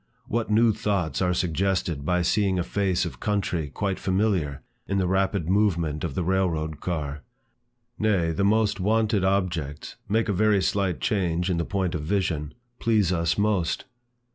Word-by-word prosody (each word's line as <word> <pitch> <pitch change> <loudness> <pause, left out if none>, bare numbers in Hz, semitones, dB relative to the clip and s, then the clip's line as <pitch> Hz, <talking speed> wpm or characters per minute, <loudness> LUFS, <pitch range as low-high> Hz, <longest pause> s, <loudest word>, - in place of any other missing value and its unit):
What 115 0 -2
new 110 +1 +4
thoughts 95 -6 -1
are 90 -1 +2
suggested 90 -3 0
by 90 +3 +1
seeing 95 0 +2
a 90 - +1
face 95 -2 0
of 85 - -7
country 95 -7 -1
quite 95 +5 -2
familiar, 95 -7 0 0.2
in 100 - 0
the 95 - +1
rapid 95 -2 0
movement 85 -6 +1
of - - -3
the 95 - 0
rail 95 +1 +2
road 80 -2 -4
car! 75 -4 -3 0.8
Nay, 95 -7 +2
the 80 +5 -1
most 105 +1 +2
wonted 110 +1 +2
objects, 85 -7 -1
(make 110 +3 +2
a 100 - +1
very 105 +1 +3
slight 95 -4 0
change 90 -3 0
in 85 - 0
the 85 - -1
point 95 -3 -1
of 80 - -2
vision,) 80 -3 -1 0.2
please 105 -6 +2
us 85 -1 0
most. 100 -5 0
95 Hz, 165 wpm, -25 LUFS, 85-100 Hz, 0.8 s, new